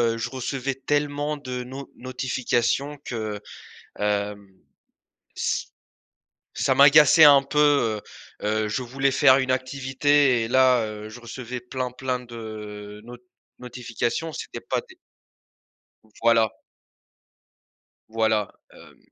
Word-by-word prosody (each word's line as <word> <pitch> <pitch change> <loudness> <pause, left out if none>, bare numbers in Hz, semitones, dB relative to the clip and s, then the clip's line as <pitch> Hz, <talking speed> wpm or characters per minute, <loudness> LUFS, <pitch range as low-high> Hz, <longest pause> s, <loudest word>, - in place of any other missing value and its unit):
heu, - - -6
je 120 +2 -3
recevais 130 +1 -3
tellement 145 +2 -1
de 125 -3 -5
no 130 +2 -9
notifications 130 +2 -1
que, 110 -3 -4 0.6
hem, 105 -1 -2 0.9
ç - - -1 0.9
ça - - +2
m'agaçait 150 +2 +7
un 140 -2 +7
peu. 140 -6 +2 0.4
Heu - - -5
heu, 110 0 0
je 125 +5 -2
voulais 135 +3 0
faire 130 -1 +6
une 130 -1 0
activité 130 0 +2
et - - -3
là, 130 0 +4
heu, 105 0 -7
je 115 +3 -11
recevais 125 +1 -7
plein, 125 +1 -4
plein 125 0 -3
de 105 -3 -9
not 120 +1 -10 0.4
notifications, 125 +5 -3
c'était - - -7
pas - - -2
des - - -16 1.1
Donc 110 -1 -27
voilà. 115 -1 +4 1.6
Voilà, 110 -2 0 0.2
hem, - - -17
125 Hz, 120 wpm, -24 LUFS, 110-135 Hz, 1.6 s, m'agaçait